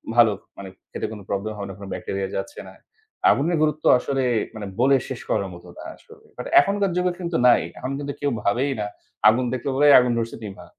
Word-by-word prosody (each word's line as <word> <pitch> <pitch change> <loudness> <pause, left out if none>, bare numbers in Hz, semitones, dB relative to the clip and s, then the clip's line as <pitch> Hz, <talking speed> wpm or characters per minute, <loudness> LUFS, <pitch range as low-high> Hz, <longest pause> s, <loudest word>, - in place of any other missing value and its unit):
ভালো 115 -3 +6 0.2
মানে 95 -1 -8 0.2
খেতে - - -4
কোন 110 - -8
প্রবলেম 100 +2 -2
হবে 100 - -5
না। - - -6
কোন 100 - -8
ব্যাকটেরিয়া 95 -1 -4
যাচ্ছে 290 - -5
না। - - -12 0.6
আগুনের 165 +4 +2
গুরুত্ব 155 0 0
আসলে 135 0 -1 0.3
মানে 105 -2 -6
বলে 135 +2 +5
শেষ - - -5
করার - - 0
মতো - - -13
না। - - -9
আসলে 450 -1 -19
বাট - - -6
এখনকার 200 - +1
যুগে 180 0 +1
কিন্তু 170 -2 -2
নাই। 125 - +6 0.2
এখন 130 +2 -4
কিন্তু 140 0 -4
কেউ 145 -1 0
ভাবেই 125 +8 +1
না 105 - -2 0.4
আগুন 125 +3 +2
দেখলে 130 +2 -3
বলে 145 +2 +4
আগুন 125 -1 +1
ধরছে 115 0 -3
নিভা। 100 -2 -9
130 Hz, 205 wpm, -23 LUFS, 110-155 Hz, 0.6 s, ভালো